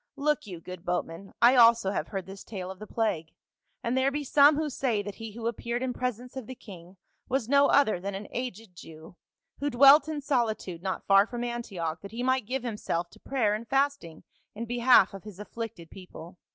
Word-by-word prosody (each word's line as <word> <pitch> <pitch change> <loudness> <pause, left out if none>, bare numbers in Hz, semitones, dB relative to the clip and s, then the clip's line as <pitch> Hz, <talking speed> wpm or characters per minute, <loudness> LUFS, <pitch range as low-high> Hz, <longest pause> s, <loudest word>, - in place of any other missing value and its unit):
Look 300 -3 0
you, 180 -4 -7
good 180 +1 -10
boatman, 180 +1 -4
I 245 +2 +7
also 230 -4 +5
have - - -2
heard 195 -2 -5
this 195 0 -10
tale 190 -3 -6
of 190 - -11
the 215 - -9
plague, 200 -9 -2 0.5
and 235 +1 -1
there 260 +1 +3
be 290 +1 -3
some 285 +2 +5
who 310 +1 -1
say, 245 -6 -1
that 205 0 -6
he 225 -2 -7
who 230 +1 -4
ap 235 - -3
peared 240 +1 -3
in 255 -1 -2
presence 250 0 -4
of 260 -4 -7
the 260 - -7
king 185 -4 -13 0.3
was 260 -3 0
no 280 +2 +5
other 245 -10 +3
than 195 +2 -5
an 200 +1 -7
aged 225 -6 -6
Jew, 160 0 -13 0.4
who 290 - -1
dwelt 275 +4 +7
in 310 -2 -3
solitude 225 - -1
not 190 0 -4
far 195 +1 +5
from 240 0 -5
Antioch 195 -10 -4
that 200 - -10
he 240 +2 -4
might 260 -3 +1
give 260 +1 -3
himself 185 -7 -3
to - - -18
prayer 235 -7 0
and 220 +2 -5
fasting 275 - -1 0.3
in 230 +2 -5
behalf 240 -4 +4
of 195 - -9
his 210 -3 -11
afflicted 210 -6 -7
people. 180 -1 -12
225 Hz, 215 wpm, -28 LUFS, 190-255 Hz, 0.5 s, I